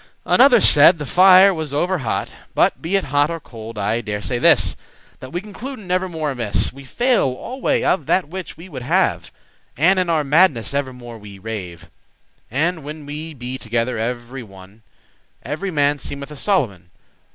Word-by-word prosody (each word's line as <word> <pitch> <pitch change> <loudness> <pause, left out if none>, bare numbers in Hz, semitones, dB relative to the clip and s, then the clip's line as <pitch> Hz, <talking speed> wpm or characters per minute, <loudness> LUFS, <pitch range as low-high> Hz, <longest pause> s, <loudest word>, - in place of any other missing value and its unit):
Another 250 -2 +6
said, 165 -1 +6
the 150 - -5
fire 185 +4 +6
was 155 -4 -4
over 180 +4 0
hot. 120 -5 -3 0.2
But - - +2
be 170 +5 -2
it 195 - +2
hot 145 +2 +3
or 165 0 -4
cold, 115 -6 -10
I 105 +3 -1
dare 105 -2 -4
say 120 +3 -3
this, - - +4 0.4
That 130 - -10
we 175 +2 -3
concluden 215 0 -8
evermore 175 -5 -1
amiss; 115 -6 -2
We 140 +1 -12
fail 245 - +1
alway 260 +1 -1
of 160 -7 0
that 185 -5 +1
which 185 0 -8
we 170 +3 -11
would 135 -8 -8
have; 120 - 0 0.5
And 185 +7 +4
in 180 -2 0
our 160 -2 +2
madness 145 -4 +2
evermore 125 -4 -5
we 100 -1 -12
rave. 95 -5 -7 0.6
And 160 +6 -1
when 150 +1 -8
we 155 +2 -6
be 125 +1 -5
together 115 0 -2
every 120 +3 -4
one, 95 0 -15 0.6
Every 155 +9 -4
man 145 -3 +1
seemeth 140 +1 -6
a - - -8
Solomon. 120 - -1
145 Hz, 175 wpm, -20 LUFS, 120-180 Hz, 0.6 s, Another